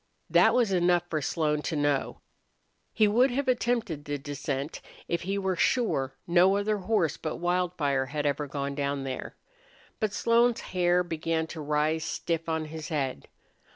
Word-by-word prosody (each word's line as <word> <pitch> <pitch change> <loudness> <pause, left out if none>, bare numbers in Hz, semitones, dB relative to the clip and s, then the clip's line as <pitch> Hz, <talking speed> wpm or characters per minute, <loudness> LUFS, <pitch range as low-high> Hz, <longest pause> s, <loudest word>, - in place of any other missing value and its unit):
That - - +5
was 240 -5 +3
enough 175 -1 +3
for 155 -2 0
Slone 150 0 0
to 160 - -3
know. 145 -2 0 0.7
He 215 -1 +3
would 245 +6 +4
have 265 +2 -2
attempted 235 - 0
the 145 0 -3
descent 140 0 -4 0.3
if 170 - -1
he 195 +3 -2
were 190 -1 0
sure 170 - +1
no 180 +3 +4
other 210 +1 0
horse 180 -6 +1
but 155 - -4
Wildfire 170 -7 0
had 150 +2 -3
ever 145 +1 0
gone 140 0 -3
down 140 -1 -2
there. 130 -1 -5 0.6
But 215 -2 0
Slone's 235 +2 +3
hair 180 0 +1
began 165 -1 -1
to 160 - -6
rise 150 +2 0
stiff 165 0 -2
on 160 -1 -1
his 155 0 -7
head. 135 - -2
165 Hz, 160 wpm, -28 LUFS, 145-195 Hz, 0.7 s, That